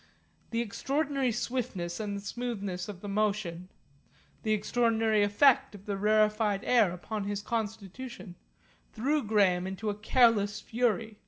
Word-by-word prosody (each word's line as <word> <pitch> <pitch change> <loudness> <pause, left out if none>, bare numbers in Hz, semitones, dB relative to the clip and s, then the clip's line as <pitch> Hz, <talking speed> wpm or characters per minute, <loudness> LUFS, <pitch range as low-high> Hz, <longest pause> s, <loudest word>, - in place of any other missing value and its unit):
The 230 0 0
extraordinary 275 +3 -1
swiftness 215 -8 -3
and 205 -2 -3
smoothness 200 -5 -4
of 190 -3 -8
the 205 - -7
motion, 200 -4 -1 0.7
the 220 - -1
extraordinary 220 0 +2
effect 265 +5 +4
of 200 0 -13
the 205 - -2
rarefied 210 0 +2
air 230 -7 +4
upon 200 +4 -5
his 205 0 -3
constitution, 220 -1 -5 0.6
threw 285 +7 +1
Graham 195 -5 +2
into 200 +3 -3
a - - -5
careless 215 -2 +3
fury. 220 -3 -1
215 Hz, 130 wpm, -30 LUFS, 200-235 Hz, 0.7 s, effect